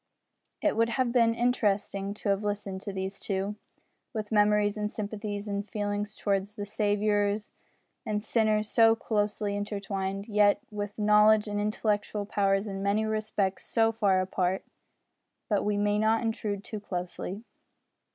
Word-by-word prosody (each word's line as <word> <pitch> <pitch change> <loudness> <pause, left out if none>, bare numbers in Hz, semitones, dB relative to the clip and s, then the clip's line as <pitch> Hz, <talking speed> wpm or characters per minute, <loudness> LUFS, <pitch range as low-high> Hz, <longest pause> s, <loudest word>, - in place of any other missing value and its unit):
It - - +2
would 230 +1 +2
have 240 +1 0
been 230 -2 +4
interesting 205 -4 0
to 210 - -3
have 200 +1 +1
listened 205 -2 -3
to 200 - -5
these 190 0 -4
two 195 +1 -2 0.6
with 215 -1 -4
memories 210 -1 +3
and 210 0 -2
sympathies 205 -1 -4
and 200 0 -3
feelings 205 0 -2
towards 200 0 -1
the 205 -2 -4
Saviour 205 0 +1 0.7
of 210 -1 -1
sinners 215 -2 +2
so 225 0 +5
closely 210 -2 -1
intertwined, 200 -1 -3
yet 205 -2 +4
with 205 -1 -5
knowledge 210 0 +5
and 205 0 -2
intellectual 210 0 -1
powers 195 0 +1
in 195 -2 -5
many 200 +2 +1
respects 215 -3 -1
so 225 -1 +2
far 200 -4 +2
apart. 185 0 -1 0.8
But 205 -2 +1
we 205 0 0
may 205 0 +2
not 220 +1 +2
intrude 215 -3 -2
too 215 - -6
closely. 180 +2 -5
205 Hz, 145 wpm, -28 LUFS, 200-215 Hz, 0.8 s, so